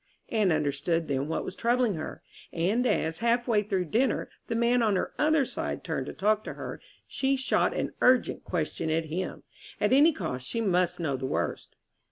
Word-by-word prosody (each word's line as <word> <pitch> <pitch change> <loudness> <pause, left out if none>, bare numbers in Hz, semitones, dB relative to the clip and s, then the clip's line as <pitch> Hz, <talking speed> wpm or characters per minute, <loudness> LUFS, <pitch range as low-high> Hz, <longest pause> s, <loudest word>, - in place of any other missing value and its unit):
Anne 215 -5 +2
understood 155 +2 0
then 140 0 -1
what 160 - -2
was - - -6
troubling 240 -1 +2
her; 155 -2 -6 0.3
and 205 +9 +1
as, 160 -5 0
half 235 +1 +1
way 220 -3 +3
through 195 -3 -1
dinner, 240 - 0 0.2
the 230 - -2
man 235 +1 +3
on 215 -3 +2
her 185 - -1
other 305 -2 +3
side - - -4
turned - - -3
to - - -4
talk 215 +1 +1
to - - -6
her, - - -7 0.2
she 270 0 0
shot 265 -1 +1
an - - -2
urgent 255 0 +3
question 160 -1 -2
at 160 +1 +1
him. 170 +4 -4 0.4
At - - +2
any 295 +5 +7
cost 135 - -4
she 230 - -2
must 180 -5 +1
know 145 -6 -1
the 130 0 -3
worst. - - -3
200 Hz, 195 wpm, -28 LUFS, 160-240 Hz, 0.4 s, any